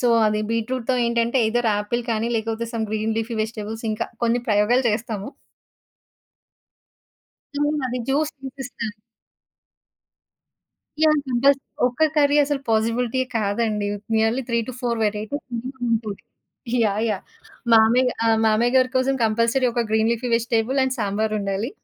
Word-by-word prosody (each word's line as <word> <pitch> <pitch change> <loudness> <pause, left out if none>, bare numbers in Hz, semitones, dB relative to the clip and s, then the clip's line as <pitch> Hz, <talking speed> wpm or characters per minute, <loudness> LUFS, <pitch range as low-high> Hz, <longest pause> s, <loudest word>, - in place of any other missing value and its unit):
So 245 - +2 0.2
అది 210 0 +1
బీట్రూట్‌తో 235 +3 -1
ఏంటంటే 235 +1 +1
either 240 +1 +1
apple 220 +4 -2
కానీ 225 +1 0
లేకపోతే 225 +1 -2
సమ్ 225 -2 -2
గ్రీన్ 220 +1 -1
లీఫీ 225 +1 -3
వెజిటబుల్స్ 220 0 -6
ఇంకా 215 +1 -2 0.2
కొన్ని 235 +1 +2
ప్రయోగాలు 215 +5 +3
చేస్తాము. 215 -2 -3 2.3
హ్మ్. 295 +1 +1
అది 250 0 -3
జ్యూస్ 295 +3 +1
తినిపిస్తాను. 265 -4 -6 2.1
యాహ్! 305 -1 +4
కంపల్సరీ. 270 +3 +3 0.3
ఒక్క 250 +5 -2
కర్రీ 290 -1 +4
అసలు 285 -1 -2
పాజిబిలిటీ 230 +3 +1 0.2
కాదండి! 210 0 0 0.3
నియర్లీ 225 +4 +2
3-4 235 0 -2
వేరైటీస్ 215 +7 -2
మినిమం 255 +2 -6
ఉంటది. 215 -3 -2 0.6
యాహ్! 205 0 0
యాహ్! 210 -3 -2 0.5
మామయ్య 235 +3 +5
ఆహ్, 225 -1 +3
మామయ్య 225 +3 +2
గారి 255 -1 +4
కోసం 260 +1 +2
కంపల్సరీ 230 +4 +2
ఒక 240 - +1
గ్రీన్ 220 +1 +2
లీఫీ 235 +2 -3
వెజిటబుల్ 235 +3 +1
అండ్ 260 0 0
సాంబారుండాలి. 210 0 -1
230 Hz, 125 wpm, -22 LUFS, 220-255 Hz, 2.3 s, మామయ్య